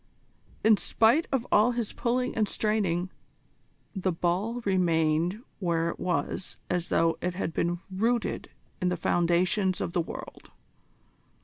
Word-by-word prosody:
In 220 -1 +6
spite 230 +12 +3
of 255 -3 0
all 220 +4 +5
his 235 -3 -3
pulling 250 +1 -1
and 215 -2 +1
straining, 190 -5 0 0.8
the 190 -1 0
ball 185 +8 -1
remained 175 +1 +1 0.2
where 170 -3 0
it - - -6
was 180 0 -2
as 180 -1 -1
though 165 0 +2
it 180 0 -2
had 175 -3 -3
been 175 +2 0
rooted 230 +5 0 0.3
in 180 - +2
the 180 - -1
foundations 175 +3 +1
of 170 - -3
the 175 - +2
world. - - -8
185 Hz, 135 wpm, -28 LUFS, 175-220 Hz, 0.8 s, In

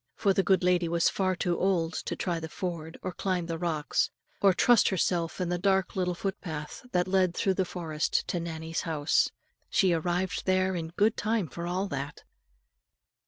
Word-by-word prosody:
For 200 -2 +2
the 195 - +3
good 190 -1 +3
lady 180 -1 +3
was 170 0 +3
far 185 -1 0
too 175 -1 -1
old 180 -3 +1
to - - -3
try 175 -2 -2
the 160 0 -6
ford, 165 -2 -5
or 185 - -2
climb 180 -2 -1
the 165 -1 -4
rocks, 160 -4 0 0.3
or 195 - +6
trust 235 +5 +5
herself 175 -3 0
in 180 -2 -1
the 175 0 -1
dark 190 0 +1
little 180 -2 0
footpath, 165 -4 -5
that 180 0 +1
led 185 -2 +2
through 195 - +2
the 190 0 0
forest 160 -4 -1
to 175 - 0
Nannie's 165 -1 -4
house. 155 -2 +2 0.4
She 190 -4 +3
arrived 175 +4 -1
there 185 0 +2
in 165 -2 -3
good 210 +2 +3
time 215 -4 0
for 170 +5 -6
all 185 +3 -1
that. 140 +1 -5
180 Hz, 185 wpm, -29 LUFS, 165-190 Hz, 0.4 s, or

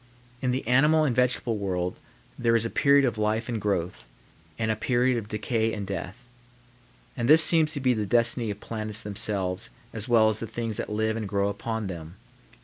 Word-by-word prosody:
In 130 - -1
the 130 +2 -2
animal 150 +6 +4
and 130 -5 0
vegetable 125 -3 +1
world 90 -2 -2 0.4
there 115 -1 +1
is 115 0 +1
a 115 - -3
period 140 -1 +4
of 120 -3 -2
life 110 +2 0
and 115 -3 -3
growth, 90 -10 -2 0.5
and 110 -1 0
a - - 0
period 125 +3 +1
of 105 - -9
decay 110 +2 -1
and 105 -2 -4
death; 100 +5 -7 0.9
and 120 +1 -2
this 160 +2 +9
seems 155 -1 +5
to 140 - -1
be 130 -2 +2
the 105 -3 -2
destiny 115 +1 +1
of 100 0 -5
planets 110 -1 -3
themselves 100 0 0 0.2
as 110 +1 -5
well 115 -3 +4
as 110 0 -1
the 115 - -4
things 115 -1 -4
that - - -4
live 110 +1 -1
and 110 -3 -4
grow 100 0 0
upon 110 +2 -4
them. 85 -2 -7
110 Hz, 200 wpm, -26 LUFS, 105-120 Hz, 0.9 s, this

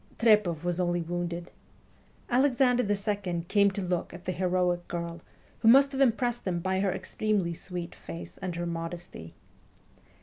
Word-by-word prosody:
Trepoff 210 -8 +3
was 175 0 -1
only 175 -1 +1
wounded. 175 0 -4 0.8
Alexander 250 -1 +3
II. 200 -4 -1
came 200 +1 +4
to 195 0 -4
look 180 -1 -2
at 175 - -12
the 185 - 0
heroic 180 -1 0
girl, 170 -1 -5 0.4
who - - +1
must 275 +4 +7
have 270 0 -2
impressed 240 -2 +1
him 175 -2 0
by 190 +2 0
her 195 -1 +1
extremely 200 -2 -1
sweet 175 0 -6
face 85 +1 -9
and 185 -3 -4
her 175 0 -3
modesty. 165 - -6
180 Hz, 155 wpm, -28 LUFS, 170-210 Hz, 0.8 s, must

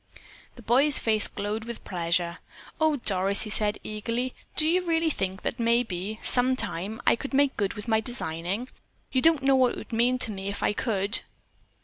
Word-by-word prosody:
The 240 - -14
boy's 270 +6 +4
face 215 -2 +4
glowed 210 +2 -5
with 235 -1 -8
pleasure. 170 -1 -2 0.4
"Oh, 315 -1 +2
Doris," 200 -5 +2
he 215 - -4
said 210 -1 +3
eagerly, 230 +4 -3 0.2
"do 310 - +6
you 360 +3 +2
really 325 -2 +1
think 190 -5 -4
that 240 - -3
maybe, 225 -3 -1
sometime, 240 -5 +1
I - - +4
could 270 +3 -6
make 280 0 +2
good 200 -1 -2
with 210 +2 -8
my 220 -1 +2
designing? 205 0 -3 0.4
You 260 - +1
don't 320 -3 +3
know 270 0 +4
what 255 -2 +3
it - - -8
would - - -10
mean 240 +3 +2
to 235 -3 -1
me 195 -1 -6
if 200 - -4
I - - +1
could." 210 -1 0
230 Hz, 190 wpm, -26 LUFS, 200-255 Hz, 0.4 s, do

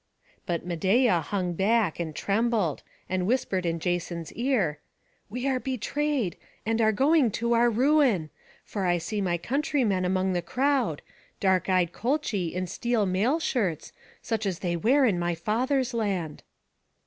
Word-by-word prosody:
But 170 -1 -2
Medeia 185 +3 +2
hung 180 -1 -2
back, 200 -1 +1
and 160 -3 -4
trembled, 210 - 0 0.3
and 185 0 -1
whispered 200 -7 0
in 165 0 0
Jason's 170 -1 -3
ear, 225 - 0 0.5
"We 250 +5 -3
are 265 -2 +1
betrayed, 265 - -1 0.3
and 225 +1 +1
are 220 -1 +4
going 275 +3 +3
to 235 +1 0
our 235 +1 +4
ruin; 245 - +2 0.3
for 195 -3 -2
I 175 0 +3
see 200 +5 -3
my 175 -3 0
countrymen 240 - 0
among 185 +1 +1
the 175 - 0
crowd; 250 - 0 0.4
dark 190 -1 +2
eyed 180 -2 +2
Colchi 230 - -1
in 185 +1 -2
steel 230 +4 0
mail 205 - +1
shirts, 205 - -1 0.3
such 220 -3 -1
as 185 -3 -2
they 175 -1 -2
wear 260 - +3
in 195 -7 +2
my 175 0 0
father's 250 - 0
land." 195 -9 -2
205 Hz, 150 wpm, -27 LUFS, 175-245 Hz, 0.5 s, are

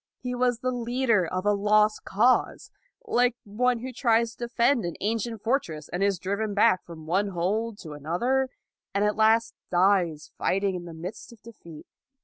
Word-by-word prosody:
He 250 -1 -5
was 245 -1 0
the 255 - 0
leader 240 -5 +1
of 185 +3 -3
a 205 - +4
lost 210 +1 +2
cause, 240 +6 +1 0.3
like 245 - +2
one 235 +3 0
who 255 +1 -6
tries 230 -2 +2
to 240 - -6
defend 235 +1 +2
an 170 -2 -4
ancient 225 +1 -2
fortress, 195 - -1
and 175 - -4
is 200 -1 +2
driven 200 +4 -2
back 210 -3 +4
from 160 -2 -11
one 190 +5 +1
hold 200 +5 -2
to 160 - -9
another, 235 - 0 0.5
and 200 +1 +2
at 210 - +1
last 225 +1 +3 0.2
dies 180 -4 +2
fight 195 +2 0
ing 195 -1 +1
in 175 -1 -5
the 170 - -8
midst 180 +9 -8
of 230 -3 -17
defeat. 170 -9 -12
210 Hz, 180 wpm, -26 LUFS, 185-235 Hz, 0.5 s, a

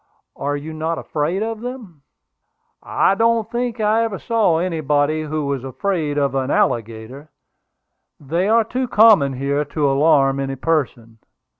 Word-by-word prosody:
"Are 145 +1 -2
you 155 +2 -8
not 160 +1 -3
afraid 160 +7 -2
of 225 -1 -4
them?" 235 - -8 0.8
"I - - +1
don't 230 +1 +1
think 240 -1 -3
I 215 +1 +2
ever 220 -4 -3
saw 220 -8 +1
anybody 155 -3 0
who 155 -1 -3
was 140 -2 -3
afraid 150 +1 -2
of 140 -1 +1
an 135 -1 -1
alligator; 115 +6 -2 0.9
they 165 +7 -1
are 230 +1 +4
too 255 +3 -3
common 210 - +5
here 140 +3 -1
to 145 0 -1
alarm 135 -1 +3
any 135 0 -3
person. 125 -6 -2
155 Hz, 145 wpm, -20 LUFS, 140-210 Hz, 0.9 s, common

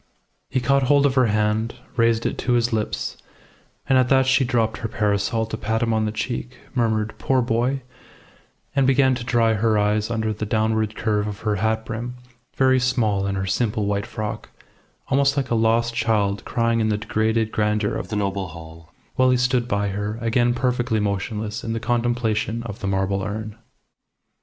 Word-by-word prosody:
He 130 - 0
caught 140 +2 +2
hold 145 -1 +5
of 140 - +3
her 130 -2 +4
hand, 110 +2 0 0.2
raised 115 -1 +2
it - - 0
to 125 - 0
his 120 0 +2
lips, 110 -1 -2 0.7
and 130 -1 +4
at 125 -1 +2
that 130 -1 +4
she 135 +1 +3
dropped 115 -3 0
her 115 - -3
parasol 105 +1 0
to 110 0 -5
pat 110 +1 -1
him 115 -1 +1
on 110 -1 +1
the 105 - -1
cheek, 120 +3 -4 0.2
murmured 110 -4 0
"Poor 130 -1 +2
boy," 125 +3 0 0.9
and 135 -2 +3
began 135 0 +4
to 120 -1 -4
dry 115 -2 +2
her 110 0 +2
eyes 105 +1 +1
under 110 -2 -1
the 105 - -5
downward 110 0 0
curve 105 -2 0
of 105 0 -6
her 105 -2 0
hat 110 +2 0
brim, 120 +2 -5 0.4
very 130 -1 +4
small 110 -6 +1
in 100 - -1
her 95 0 -2
simple, 105 +1 0
white 100 0 -1
frock, 110 -2 -5 0.6
almost 140 +1 +2
like 135 -3 -1
a - - +3
lost 115 +1 +2
child 105 -4 0
crying 115 -1 +1
in 110 -1 +1
the 105 - +1
degraded 110 0 0
grandeur 105 -1 0
of - - -4
the 110 - -4
noble 100 -2 -1
hall, 80 -1 -12 0.3
while 130 0 +4
he 125 - +4
stood 125 -1 +1
by 100 -3 0
her, 105 +2 -3
again 120 +1 +1
perfectly 125 -2 0
motionless 105 +2 -2
in 115 - -2
the 115 - -2
contemplation 115 -1 0
of 110 -3 -7
the 100 - -3
marble 95 0 0
urn. 105 +2 -5
110 Hz, 190 wpm, -23 LUFS, 105-120 Hz, 0.9 s, hold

